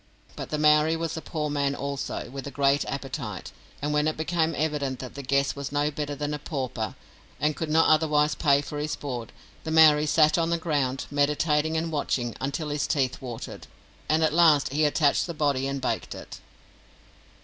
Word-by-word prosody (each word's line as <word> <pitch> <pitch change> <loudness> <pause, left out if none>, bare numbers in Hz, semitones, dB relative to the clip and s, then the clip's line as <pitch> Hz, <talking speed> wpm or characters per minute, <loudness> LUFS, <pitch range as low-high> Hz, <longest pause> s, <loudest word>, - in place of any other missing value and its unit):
But - - -6
the 155 - -1
Maori 150 +1 +4
was 165 -1 -3
a 160 - -5
poor 155 -2 -3
man 140 -1 0
also, 140 0 -4
with 135 0 -6
a - - -3
great 140 +1 +2
appetite, 135 - -5 0.3
and 150 +1 0
when 150 +1 +2
it 155 - -1
became 160 0 0
evident 145 -4 -1
that 130 -1 -8
the 140 - -6
guest 140 +1 +1
was 140 -1 -5
no 145 +1 +1
better 145 0 -4
than 145 +1 -3
a 150 - -3
pauper, 130 - -4 0.4
and 150 +1 +1
could 160 - -4
not 160 +1 +4
otherwise 150 -1 +3
pay 140 -3 +3
for 145 0 -5
his 150 0 -2
board, 125 -5 -6 0.3
the - - -5
Maori 155 -1 +6
sat 155 +1 +4
on 165 0 +1
the 170 - +1
ground, 140 -5 -1
meditating 150 +2 +1
and 165 +1 -2
watching, 125 -5 -1
until 140 +3 -2
his 145 0 -1
teeth 135 -5 0
watered, 120 -3 -7 0.4
and 155 +1 +3
at 155 - +2
last 155 -5 +4
he 155 +1 +2
attached 150 +1 +2
the 170 - -5
body 140 -3 +1
and 140 0 -3
baked 130 - -2
it. - - -10
150 Hz, 195 wpm, -26 LUFS, 140-155 Hz, 0.4 s, Maori